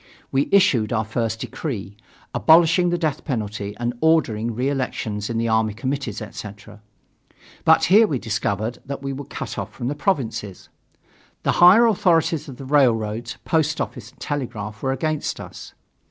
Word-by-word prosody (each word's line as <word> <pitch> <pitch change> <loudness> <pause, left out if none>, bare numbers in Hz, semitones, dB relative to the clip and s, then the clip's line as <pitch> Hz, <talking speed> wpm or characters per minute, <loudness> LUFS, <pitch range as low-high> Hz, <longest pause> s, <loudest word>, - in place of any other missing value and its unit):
We 135 +1 +1
issued 130 - +4
our 110 -2 0
first 115 0 -2
decree, 120 - -5 0.4
abolishing 170 +2 +5
the 175 - 0
death 155 -5 -2
penalty 105 -6 -4
and 120 0 -2
ordering 120 -9 +2
reelections 125 -5 -2
in 115 - -2
the 115 0 0
army 110 -1 +1
committees, 130 -3 -3
etc. 105 0 -10 0.8
But - - +5
here 210 +6 +6
we 145 - -1
discovered 110 0 -2
that 140 0 -6
we 135 0 -3
were 140 +1 -7
cut 145 - -6
off 100 +2 -5
from 120 +2 -4
the - - -1
provinces. 135 - -2 0.7
The - - +2
higher 190 +7 +8
authorities 165 -7 +2
of 130 - -9
the 135 - -8
railroads, 120 -4 +1
post 160 -1 +1
office 120 -3 -5
and 130 - -25
telegraph 115 -7 -5
were 130 - 0
against 155 +3 -2
us. - - -10
125 Hz, 155 wpm, -22 LUFS, 110-150 Hz, 0.8 s, higher